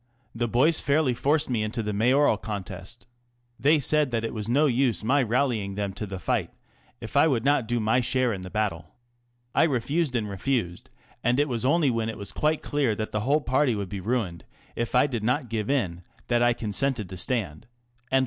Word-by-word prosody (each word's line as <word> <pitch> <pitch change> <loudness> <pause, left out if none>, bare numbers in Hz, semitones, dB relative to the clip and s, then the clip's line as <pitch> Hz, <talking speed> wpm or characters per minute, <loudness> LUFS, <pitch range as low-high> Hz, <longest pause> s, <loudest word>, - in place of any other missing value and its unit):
The 120 +1 -1
boys 135 +8 +2
fairly 140 -2 +2
forced 145 +5 +1
me 120 -4 -1
into 110 +2 -2
the 105 0 -2
Mayoral 125 +5 +3
contest. 100 0 -7 0.5
They 150 +4 +4
said 150 0 +1
that 115 -2 -1
it 115 - -3
was 110 -1 -4
no 140 +6 +4
use 125 - +1
my 135 +6 +3
rallying 115 -5 0
them 100 -1 -2
to 105 +2 -5
the 95 0 -5
fight 90 - -1 0.5
if 115 +3 -9
I 145 +3 +6
would 130 -5 0
not 140 -5 +2
do 120 +1 0
my 110 +3 +2
share 125 0 +1
in 95 - -5
the 90 - -7
battle. 105 -3 -3 0.6
I - - +4
refused 145 +1 0
and 110 -3 0
refused, 100 -3 -2 0.3
and 125 +3 +2
it 145 - +3
was 120 -2 -2
only 145 0 +3
when 115 -1 -1
it 110 - -6
was 100 -2 -6
quite 155 0 0
clear 140 -7 0
that 110 +1 -4
the 105 - -1
whole 140 +8 +2
party 130 -2 +1
would 100 -3 -4
be 100 +1 -5
ruined 95 -6 -2 0.3
if 120 +1 -2
I 125 - +5
did 120 -7 -3
not 125 +2 0
give 110 -2 -2
in 95 -12 0 0.3
that 120 -1 +2
I 120 0 +4
consented 115 0 -1
to 95 - -8
stand." 95 - -3
120 Hz, 205 wpm, -26 LUFS, 105-135 Hz, 0.6 s, I